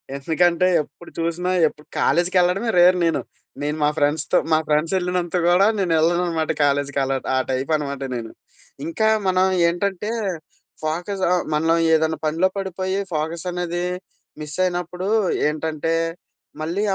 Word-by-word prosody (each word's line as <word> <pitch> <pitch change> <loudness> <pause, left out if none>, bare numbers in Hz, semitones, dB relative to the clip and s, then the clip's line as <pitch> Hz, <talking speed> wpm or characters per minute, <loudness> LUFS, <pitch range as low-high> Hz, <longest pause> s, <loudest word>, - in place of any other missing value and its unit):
ఎందుకంటే, 170 +5 +2
ఎప్పుడు 150 +4 -13
చూసినా 170 +2 -1 0.2
ఎప్పుడు 150 0 -10
కాలేజ్‌కెళ్ళడమే 180 +5 +2
రేర్ 180 +1 +6
నేను. 155 -5 +1 0.4
నేను 150 +1 -2
మా 150 - +4
ఫ్రెండ్స్‌తో 145 0 +2
మా 155 - +5
ఫ్రెండ్స్ 155 +3 +1
ఎళ్ళినంత 180 -1 -1
గూడా 180 +3 +5
నేను 180 -4 +1
ఎళ్ళననమాట 165 -1 +1
కాలేజ్‌కి 140 0 +1
అలా 135 0 0 0.2
ఆ - - +2
టైపనమాట 140 +1 -1
నేను. 115 -2 -5 0.5
ఇంకా 220 +7 0 0.2
మనం 185 0 +3 0.2
ఏంటంటే 195 +4 -1 0.7
ఫోకస్ 175 +5 -2
ఆహ్, 180 -1 +2
మనం 160 +2 +2 0.2
ఏదైనా 160 0 +2
పనిలో 165 +4 +2
పడిపోయి, 190 0 -2
ఫోకసనేది 175 +2 -2 0.6
మిస్సైనప్పుడు 180 +3 -2 0.4
ఏంటంటే, 155 +1 -2 0.7
మళ్ళీ 170 +6 -1
170 Hz, 120 wpm, -22 LUFS, 155-180 Hz, 0.7 s, రేర్